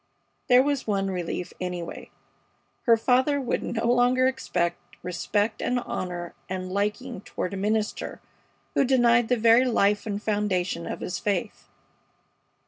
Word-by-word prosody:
There 250 -1 +6
was 285 -3 -1
one 195 -2 0
relief, 180 -1 -4
anyway. 180 -2 -5 0.8
Her 230 -1 +7
father 260 +5 +2
would 255 -3 -1
no 230 -1 -2
longer 245 +2 +3
expect 215 -10 0 0.2
respect 205 +4 -1
and 250 0 0
honor 175 -6 -5 0.2
and 185 0 -4
liking 210 +3 -2
toward 185 - -4
a - - -3
minister 215 +2 -1 0.5
who - - +3
denied 240 -3 +4
the 250 - +2
very 230 +3 +5
life 210 -4 +2
and 205 -1 -2
foundation 190 -5 -1
of - - -5
his 180 - -3
faith. 200 -4 -2
215 Hz, 135 wpm, -26 LUFS, 185-245 Hz, 0.8 s, Her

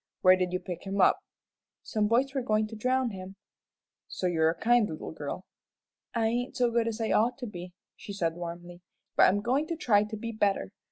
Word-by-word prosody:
"Where 185 0 +7
did 180 -1 -1
you 185 - -1
pick 180 +1 -7
him 195 +1 -2
up?" - - +5 0.6
"Some 215 -2 0
boys 255 +5 +2
were 270 - 0
goin' 215 -2 +1
to 225 - -8
drown 255 +2 +1
him." 190 0 -8 0.7
"So - - -5
you're 160 -3 +3
a 165 - -2
kind 235 -2 +3
little 155 - -6
girl." 160 +4 -6 0.7
"I 230 -1 +2
ain't 240 +3 -1
as 245 -1 +3
good 230 -1 +1
as 230 0 -3
I 225 - -1
ought 235 +3 +2
to 260 - -6
be," 180 -4 -8 0.2
she - - -9
said, 170 -5 -1
warmly; 175 +1 -8 0.3
"but - - +7
I'm 205 +2 +1
goin' 260 +7 +1
to 335 - -2
try 210 -9 +3
to 215 +1 -6
be 230 +2 -5
better. 205 -3 0
210 Hz, 215 wpm, -29 LUFS, 180-235 Hz, 0.7 s, Where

